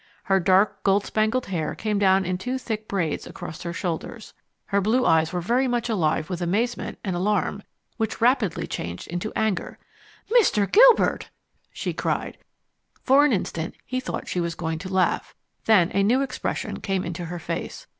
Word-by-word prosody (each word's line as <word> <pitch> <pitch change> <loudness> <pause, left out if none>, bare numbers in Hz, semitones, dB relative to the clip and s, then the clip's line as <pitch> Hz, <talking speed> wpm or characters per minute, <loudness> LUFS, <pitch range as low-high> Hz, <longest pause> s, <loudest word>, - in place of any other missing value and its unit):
Her 195 0 +2
dark, 190 +3 +3
gold 200 +1 +2
spangled 220 +4 0
hair 170 -5 -3
came 215 -2 -1
down 190 -1 +4
in 180 +1 -2
two 250 +7 -2
thick 220 -4 -4
braids 175 -6 -2
across 160 - -8
her 170 - -4
shoulders. 180 +5 -5 0.3
Her 200 0 +1
blue 230 +6 +2
eyes 160 0 +3
were 180 - -2
very 245 +9 +1
much 240 -1 -1
alive 155 -7 +1
with 180 -1 -4
amazement 220 +8 -1
and 190 -3 -2
alarm 200 +2 0 0.4
which 220 -2 -2
rapidly 230 -6 +2
changed 85 +1 -5
into 175 +5 -3
anger. 215 -4 -1 0.5
"Mr. 420 - +4
Gilbert!" - - +5 0.4
she - - -4
cried. - - -2 0.6
For 275 +2 +5
an 295 - +3
instant 170 -6 -2
he 255 0 -2
thought 255 - -5
she 180 - -2
was 170 -1 -2
going 160 -1 -3
to 185 +2 -7
laugh. 185 -1 0 0.3
Then 190 -6 +4
a 200 - +2
new 245 +7 +3
expression 275 - -4
came 195 -2 -1
into 175 0 -5
her 175 +1 -5
face. 165 - -5
195 Hz, 175 wpm, -24 LUFS, 175-225 Hz, 0.6 s, Gilbert